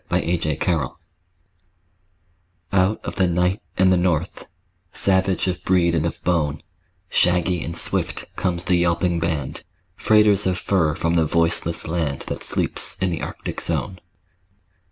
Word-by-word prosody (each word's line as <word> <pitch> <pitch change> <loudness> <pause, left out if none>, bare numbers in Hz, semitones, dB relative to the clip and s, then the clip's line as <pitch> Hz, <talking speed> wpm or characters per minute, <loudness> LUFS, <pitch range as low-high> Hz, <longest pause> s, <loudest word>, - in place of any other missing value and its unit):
THE 85 +2 +1
TRAIN 75 -3 -1
DOGS 80 -8 -1 1.8
Out 95 +3 +2
of - - -5
the 95 -2 +3
night 90 +3 0 0.2
and 95 0 +4
the - - +3
north; 85 -2 -1 0.4
Savage 95 -2 +3
of 90 -1 -3
breed 85 -2 +2
and 80 0 +1
of - - -7
bone, 80 -4 0 0.4
Shaggy 90 -1 +1
and 85 - -1
swift - - 0
comes 85 -1 -1
the 90 - +2
yelping 85 0 +1
band, 80 -5 -3 0.3
Freighters 105 -2 +3
of 90 -1 0
fur 85 -5 +1
from 85 +1 0
the 85 -2 +3
voiceless 85 +1 0
land 80 -5 -2
That - - -6
sleeps - - -2
in 95 -2 0
the 85 - -3
Arctic - - -5
zone. 95 -1 -3
85 Hz, 145 wpm, -22 LUFS, 85-95 Hz, 1.8 s, and